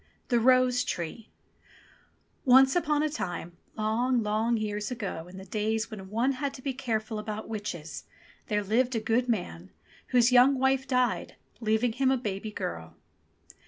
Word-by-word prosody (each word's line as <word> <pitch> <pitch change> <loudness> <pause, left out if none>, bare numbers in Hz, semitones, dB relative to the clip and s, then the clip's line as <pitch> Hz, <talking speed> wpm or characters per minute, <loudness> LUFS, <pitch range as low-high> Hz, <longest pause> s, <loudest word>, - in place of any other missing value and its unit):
THE 240 -2 +3
ROSE 255 +1 +4
TREE 195 +1 -5 1.1
ONCE 265 +2 +6
upon 300 -4 +2
a - - +2
time, 175 - -5 0.2
long 230 +3 +1
long 220 +3 +1
years 210 -1 -3
ago 200 -9 -5
in 185 +1 -11
the 190 - -9
days 220 +3 -1
when 195 -3 -8
one 235 +6 +1
had 275 +1 -3
to 255 - -11
be 275 - -1
careful 225 -4 -2
about 215 0 -5
witches, 190 -8 -6 0.4
there 210 -2 0
lived 240 +5 +1
a - - +1
good 235 +3 0
man, 90 - -3 0.4
whose 245 -1 +4
young 255 +2 +6
wife 265 +1 +1
died, 255 -1 0 0.2
leaving 220 +1 +1
him 260 +2 +2
a 265 - +3
baby 210 -3 -4
girl. 80 - -5
225 Hz, 160 wpm, -28 LUFS, 210-255 Hz, 1.1 s, ONCE